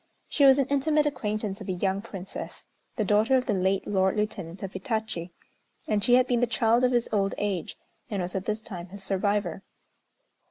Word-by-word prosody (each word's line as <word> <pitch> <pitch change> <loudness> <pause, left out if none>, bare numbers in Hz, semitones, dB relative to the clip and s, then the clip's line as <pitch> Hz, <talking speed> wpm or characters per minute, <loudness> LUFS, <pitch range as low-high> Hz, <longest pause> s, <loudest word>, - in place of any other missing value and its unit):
She 285 - +3
was 270 0 +8
an 275 - +3
intimate 295 +2 +2
acquaintance 210 -7 -2
of - - -7
a - - +1
young 190 +2 0
Princess, 195 -4 -7 0.3
the 215 - 0
daughter 215 +6 +4
of 255 - -1
the 220 - 0
late 190 0 +1
Lord 190 0 +1
Lieutenant 195 -4 -3
of 195 - -5
Hitachi, 190 -3 -3 0.6
and 210 -2 +1
she 245 - +5
had 255 0 +5
been 245 -2 +1
the 245 - +2
child 230 +2 +2
of 250 - +4
his 240 -1 +2
old 195 -2 +1
age, 200 -5 -2 0.3
and 205 -4 -2
was 180 0 -3
at 190 0 -3
this 215 0 -1
time 185 -5 -8
his 195 +2 -9
survivor. 195 -2 0
210 Hz, 200 wpm, -27 LUFS, 190-235 Hz, 0.6 s, was